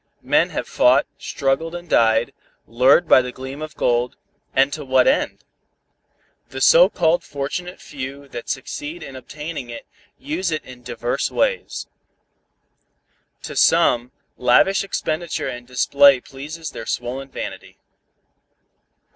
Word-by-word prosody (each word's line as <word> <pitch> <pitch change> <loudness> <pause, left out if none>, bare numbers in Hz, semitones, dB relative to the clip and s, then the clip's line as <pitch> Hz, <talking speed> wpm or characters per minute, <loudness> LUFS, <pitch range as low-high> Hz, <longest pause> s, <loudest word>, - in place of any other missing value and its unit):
Men - - +3
have - - -4
fought, 130 +3 +4
struggled 145 +5 -1
and 175 0 -8
died, 115 -4 +3 0.3
lured 130 +8 +4
by - - +7
the 125 0 -5
gleam 130 +3 -8
of 155 0 -7
gold, 120 0 0 0.4
and 135 +2 +2
to 155 - -5
what 130 - +3
end? 270 +3 +1 1.1
The - - -6
so - - +7
called 165 0 +1
fortunate 165 +6 -5
few 140 0 -8
that 120 -2 -8
succeed 145 +5 -5
in 135 - -9
obtaining 150 0 -7
it, 120 - -8 0.3
use 265 - -3
it 155 -1 -3
in 125 -1 -12
divers 120 0 -2
ways. - - -1 1.6
To - - -7
some, 125 -7 +3 0.3
lavish 125 +12 +4
expenditure 170 -3 -3
and 120 0 -7
display 140 +2 +5
pleases 150 +6 -8
their 115 - -8
swollen 130 +3 -4
vanity. - - -7
140 Hz, 130 wpm, -21 LUFS, 125-165 Hz, 1.6 s, by